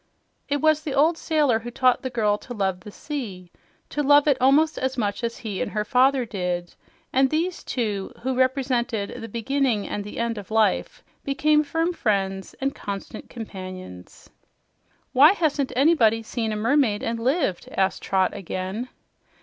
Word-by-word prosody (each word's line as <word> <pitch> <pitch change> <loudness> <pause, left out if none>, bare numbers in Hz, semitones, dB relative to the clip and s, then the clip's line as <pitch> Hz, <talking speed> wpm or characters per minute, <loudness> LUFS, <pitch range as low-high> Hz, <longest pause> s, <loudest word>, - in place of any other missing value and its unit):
It 285 -1 0
was 310 -1 +3
the 300 -3 -4
old 315 +4 +4
sailor 300 -8 +1
who 235 +2 -7
taught 255 +1 +2
the 260 - -3
child 210 -4 0
to 245 - -8
love 190 -3 -1
the 195 - -11
sea, 205 - -6 0.4
to 295 - -2
love 290 +1 +5
it 285 - +5
almost 295 +5 +4
as 260 0 -2
much 205 -1 -2
as 230 0 -2
he 210 -5 -5
and - - -1
her 210 0 -1
father 255 +2 +3
did, 180 -4 -3 0.4
and 265 +1 +4
these 340 +4 -1
two, 210 -6 -2
who 260 +1 0
represented 255 -4 0
the 225 - -6
"beginning 235 -1 0
and 205 - -3
the 205 - -9
end 230 -2 -1
of 200 - -11
life," 220 -1 +1 0.2
became 300 +2 +3
firm 325 +4 -1
friends 195 - -1
and 275 +1 -1
constant 200 -1 -7
companions. 185 - -9 0.9
"Why 285 +7 +7
hasn't 295 -7 0
anybody 245 -6 +4
seen 225 0 -3
a - - -2
mermaid 230 -1 +2
and 230 0 -2
lived?" 255 - 0
asked 190 0 0
Trot 190 -1 +1
again. 190 +6 -4
240 Hz, 165 wpm, -24 LUFS, 205-280 Hz, 0.9 s, Why